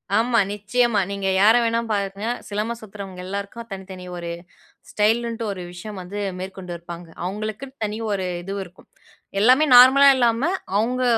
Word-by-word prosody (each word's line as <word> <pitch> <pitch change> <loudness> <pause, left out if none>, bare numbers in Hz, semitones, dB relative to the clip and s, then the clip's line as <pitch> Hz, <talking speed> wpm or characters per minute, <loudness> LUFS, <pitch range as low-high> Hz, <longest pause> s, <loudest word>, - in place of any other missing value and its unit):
ஆமா, 230 +1 +3
நிச்சயமா. 220 +2 +1
நீங்க 200 -1 -2
யார 220 +3 +7
வேணாலும் 230 0 0
பாருங்க. 200 +1 -2 0.2
சிலம்பம் 215 +3 -3
சுத்துறவங்க 195 -3 -9
எல்லாருக்கும், 200 +4 -6
தனி 190 0 -6
தனி 185 -1 -9
ஒரு 170 -1 -5 0.6
ஸ்டைலுண்ட்டு 230 +2 +1
ஒரு 190 -2 -6
விஷயம் 190 +3 -8
வந்து 195 +3 -6 0.2
மேற்கொண்டு 185 -1 -7
இருப்பாங்க. 170 0 -9 0.2
அவுங்களுக்குன்னு 215 +7 -5
தனி 210 +1 -4
ஒரு 195 -2 -1 0.2
இதுவு 195 +2 -4
இருக்கும். 175 0 -18 0.5
எல்லாமே 260 +7 +5
நார்மலா 265 +3 +9
இல்லாம, 240 +6 +2 0.3
அவுங்க 250 +4 0
210 Hz, 145 wpm, -22 LUFS, 195-235 Hz, 0.6 s, நார்மலா